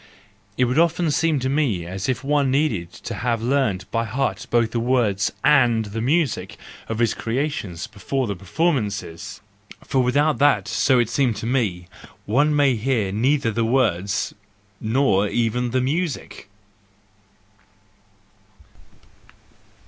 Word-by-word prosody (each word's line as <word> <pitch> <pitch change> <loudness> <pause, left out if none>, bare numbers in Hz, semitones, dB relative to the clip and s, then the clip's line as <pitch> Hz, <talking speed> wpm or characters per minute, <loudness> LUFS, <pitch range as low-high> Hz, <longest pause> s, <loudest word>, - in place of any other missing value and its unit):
It 125 - +3
would 125 +5 +1
often 170 -1 +2
seem 160 +1 +1
to 130 - -1
me 130 - 0
as 95 +5 -4
if 130 - -1
one 140 -1 +1
needed 130 - 0
to 115 - -8
have 115 +3 -1
learned 120 -7 0
by 115 0 0
heart 125 +1 -2
both 115 -2 +2
the 115 - -1
words 115 -5 +1
and 120 -6 +4
the 105 +2 -5
music 145 +1 0 0.3
of 110 - -2
his 115 -2 +2
creations 115 - -3
before 130 +6 -3
the 100 -3 -3
performances; 100 - -2 0.4
for 130 - +1
without 145 +5 +2
that—so 130 0 +3
it 120 -2 +2
seemed 125 -3 +1
to 110 - -6
me—one 120 +5 -1
may 140 -3 +3
hear 110 -4 0
neither 120 +3 +1
the 115 +2 0
words, 105 -6 0 0.5
nor 110 -4 +2
even 120 +3 0
the 130 +2 0
music. 145 - -3
120 Hz, 130 wpm, -22 LUFS, 105-140 Hz, 0.5 s, and